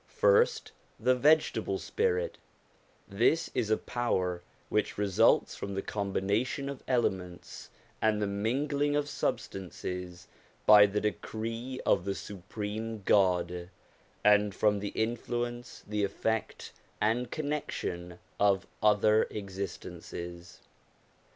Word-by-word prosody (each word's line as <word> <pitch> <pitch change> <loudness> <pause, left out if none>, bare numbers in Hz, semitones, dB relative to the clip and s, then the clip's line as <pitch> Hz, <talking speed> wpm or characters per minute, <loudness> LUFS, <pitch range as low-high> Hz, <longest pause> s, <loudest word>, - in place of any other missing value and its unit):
First 475 -2 +3 0.3
the 130 - +4
vegetable 130 -7 +3
spirit: 90 -1 -1 0.7
this 120 +11 +2
is 110 - 0
a 110 - +3
power 90 -8 -1 0.3
which - - 0
results 100 -2 +3
from 100 0 -5
the 100 - -2
combination 105 +7 -1
of 140 - -6
elements 95 -8 -2 0.3
and 110 -1 +2
the 105 - +1
mingling 140 +8 0
of 145 0 +1
substances 90 -8 -4 0.4
by 105 -1 +9
the 105 +1 -1
decree 115 +4 -4
of - - +3
the 100 0 -1
Supreme 105 +2 -5
God, 90 -3 +2 0.5
and 105 -1 +4
from 105 -1 +2
the 100 - -3
influence, 120 +2 -3
the 105 0 -1
effect, 110 +3 -2 0.3
and 115 +3 +1
connection 105 - -3 0.2
of 100 -2 +3 0.2
other 105 +1 +4
existences. 90 -3 -7
105 Hz, 105 wpm, -30 LUFS, 95-120 Hz, 0.7 s, by